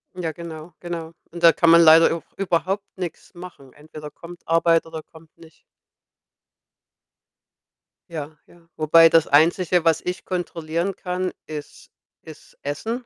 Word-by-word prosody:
Ja, 170 -3 -4
genau, 165 0 -10
genau. 170 -2 -6 0.2
Und 170 0 -10
da 165 - +8
kann 170 - +2
man 170 0 +7
leider 165 +1 +6
auch 165 - -8
überhaupt 195 +1 -1
nix 180 0 -7
machen. 175 -7 -13
Entweder 150 0 -11
kommt 175 +2 -14
Arbeit 165 0 +2
oder 160 -1 -8
kommt 160 0 -20
nicht. 165 -2 -18 2.5
Ja, 155 -2 -7
ja. 175 - -21 0.2
Wobei 165 +1 +6
das 165 -1 +3
Einzige, 170 +3 +3
was 165 -2 +2
ich 180 0 -5
kontrollieren 175 0 -3
kann, 180 0 -4
ist 150 -2 -10 0.3
ist 155 -1 -15
Essen. 225 - -5
165 Hz, 140 wpm, -22 LUFS, 160-175 Hz, 2.5 s, da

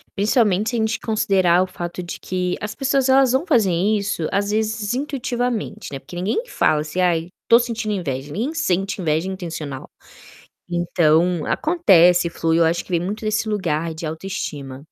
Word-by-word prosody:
Principalmente 210 0 +2
se 240 - -2
a - - 0
gente 220 0 0
considerar 190 -5 +2
o - - -4
fato 175 0 -6
de 175 - -6
que 180 -1 -2
as 210 0 -4
pessoas 270 +1 +1
elas 265 -1 +5
vão 275 +7 +1
fazer 225 - +3
isso 200 -1 0
às 200 +1 0
vezes 220 0 -1
intuitivamente, 245 -5 -3
né, 135 - -5
porque 135 +6 -12
ninguém 205 - -1
fala 155 - +2
assim: 155 +4 -2
"Ai 170 -2 +1 0.2
estou 235 +1 +6
sentindo 230 -3 -2
inveja.", 145 -7 -4
ninguém 240 - -2
sente 195 - -1
inveja 160 +2 0
intencional. 160 -7 -6 0.8
Então 170 -1 +2
acontece, 180 - +4
flui, 165 0 0
acho 165 +1 +2
que - - -18
vem 170 - +2
muito 205 +5 -4
desse 215 +1 0
lugar 165 -6 -1
de 160 0 -6
autoestima. 155 -5 -5
190 Hz, 170 wpm, -21 LUFS, 170-220 Hz, 0.8 s, estou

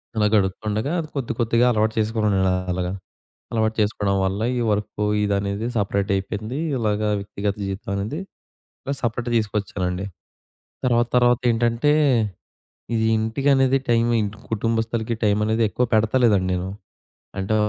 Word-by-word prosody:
అలా 105 -1 +3
గడుప్తుండగా 105 +5 0
అది 155 - -4
కొద్ది 135 -4 -2
కొద్దిగా 115 +1 +3
అలవాటు 110 -1 +1
చేసుకున్నానలాగ. 95 -5 0 0.6
అలవాటు 110 -1 +1
చేసుకోవడం 105 -1 0
వల్ల 95 +2 -1 0.2
ఈ - - 0
వర్క్ 105 0 -2 0.2
ఇదనేది 100 +1 -1
సెపరేటైపోయింది. 100 +3 -1 0.2
ఇలాగ 105 -3 0 0.2
వ్యక్తిగత 100 0 -3
జీవితమనేది 100 - -3 0.6
ఇలా 140 - -2
సపరేట్ 120 0 -2
తీసుకొచ్చానండి. 100 -4 -2 0.8
తర్వాత 120 -1 +3
తర్వాత 120 -1 +4
ఏంటంటే, 120 +4 +2 1.0
ఇది 110 0 +1
ఇంటికనేది 135 +4 +2
టైమై 115 0 +3 0.3
కుటుంబస్తలకి 115 +1 -1
టై‌మనేది 105 +2 +2
ఎక్కువ 125 - 0
పెడతలేదండి 110 -3 +3
నేను. 90 +1 -2 0.7
అంటే 95 +3 0
110 Hz, 110 wpm, -23 LUFS, 100-115 Hz, 1.0 s, తర్వాత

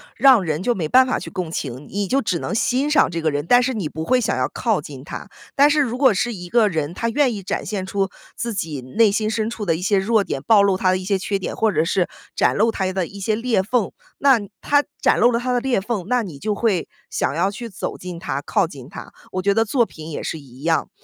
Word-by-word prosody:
让 260 -7 +6
人 160 0 -2
就 240 +3 +2
没 165 -7 -2
办 260 +9 +6
法 255 - -1
去 - - -7
共 180 -4 -4
情， 135 -3 -5
你 200 -1 -2
就 275 +3 +1
只 180 -5 -1
能 - - -3
欣 255 +5 +1
赏 300 - +4
这 165 -1 -3
个 155 - +2
人， 145 +1 -2
但 245 0 +6
是 260 0 -1
你 195 -8 -2
不 160 +1 -5
会 255 +9 +3
想 240 - 0
要 - - 0
靠 - - 0
近 - - -10
他。 - - -7 0.3
但 285 +1 +6
是 300 0 +3
如 245 -3 -1
果 260 -2 +5
是 235 +4 -1
一 180 -3 -8
个 230 0 +4
人， 160 -1 -2
他 230 - -1
愿 255 -3 +2
意 200 - -7
展 - - -2
现 195 -2 -3
出 195 0 -1 0.3
自 235 - -3
己 160 -8 -3
内 200 - +2
心 215 +1 0
深 220 0 -1
处 230 -2 -5
的 170 -5 +1
一 165 - -5
些 200 0 +3
弱 215 +1 +2
点， 135 - -4
暴 205 +6 +5
露 200 -1 +3
他 185 0 +1
的 185 - +3
一 185 - -6
些 195 0 0
缺 195 +1 -1
点， 190 - -5
或 220 -1 +2
者 160 - +1
是 180 0 +1 0.3
展 - - +2
露 225 +2 +3
他 190 -3 -1
的 190 -2 -1
一 200 +4 -10
些 210 +2 0
裂 230 -4 +1
缝， 220 0 0 0.3
那 270 -4 +5 0.2
他 290 0 +3 0.2
展 - - +3
露 240 - +6
了 235 - +1
他 250 +1 -1
的 245 - +2
裂 255 -4 +1
缝， 200 -2 -3
那 250 -1 +1
你 160 -8 -8
就 210 +4 -1
会 200 -6 0 0.2
想 140 - -1
要 190 +4 +1
去 230 +3 -7
走 190 - -5
近 180 -1 -7
他， 170 - -3
靠 - - +1
近 - - -10
他。 - - -10 0.2
我 185 - -1
觉 200 +1 +3
得 225 +2 +3
作 235 +1 +2
品 160 -4 -10
也 150 - -5
是 160 - -4
一 130 -2 -15
样， 165 0 +1
200 Hz, 295 characters per minute, -21 LUFS, 175-235 Hz, 0.3 s, 让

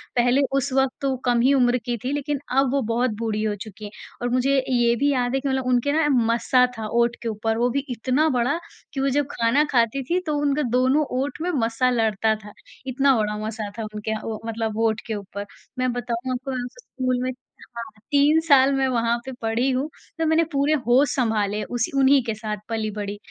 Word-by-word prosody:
पहले 245 +3 +3 0.2
उस 275 0 -1
वक़्त 265 -1 +2
तो 275 - 0
वो 260 - -1
कम 245 -1 +3
ही 270 +3 +4
उम्र 250 -2 +3
की 240 -1 -1
थीं 260 - -2
लेकिन 290 -1 -2 0.2
अब 270 -2 +3
वो 280 -1 +1
बहुत 245 +1 +1
बूढ़ी 220 -2 -1
हो 210 -1 0
चुकी 215 0 -10
हैं 205 - -8 0.3
और 245 - -1
मुझे 255 +3 +2
ये 240 -2 +3
भी 285 +4 +2
याद 250 -2 0
है - - +2
कि 275 - -3
मतलब 265 -1 -1
उनके 250 +3 +2
ना 310 0 +2 0.3
मस्सा 250 +2 +3
था 220 - -4
ओंठ 235 +1 +1
के 235 - -4
ऊपर, 220 +1 -1
वो 240 +1 +2
भी 270 +3 0
इतना 255 +6 +1
बड़ा 260 +4 +1 0.3
कि 275 - -3
वो 275 - +2
जब 285 +2 +1
खाना 235 +6 +2
खाती 240 +2 +2
थीं 355 +2 +2
तो 300 -1 -1
उनके 290 +1 +1
दोनों 265 +4 +3 0.2
ओंठ 285 +3 -4
में 360 - -1 0.2
मस्सा 235 +3 +1
लड़ता 220 -2 +1
था 210 - -11 0.3
इतना 270 +1 +3
बड़ा 210 -1 -1
मस्सा 215 -1 -4
था 225 - -2
उनके 215 +1 -4
अ, 220 - -2
व 220 -1 -4
मतलब 225 -1 -3
ओंठ 225 0 +1
के 220 - -2
ऊपर। 200 0 -6 0.3
मैं 255 -1 +1
बताऊँ 245 +1 -3
आपको 255 +2 -4
मैं 255 -1 -2
उस 245 - -8
स्कूल 255 - -2
में 255 - -1 0.5
हाँ, 235 - -3 0.3
3 290 +3 +5
साल 275 -1 +6
मैं 270 -1 +1
वहाँ 235 -2 +1
पे 265 - -5
पढ़ी 230 +4 0
हूँ, 265 +4 -1 0.3
तो 325 - 0
मैंने 320 +1 +3
पूरे 285 +1 +2
होश 260 +3 +4
सँभाले 215 -4 0
उसी 240 -2 -2
उन्हीं 270 +1 +5
के 225 -2 -2
साथ 215 -1 -4
पली 220 -1 -2
बड़ी। 205 0 -5
245 Hz, 225 wpm, -23 LUFS, 225-275 Hz, 0.5 s, साल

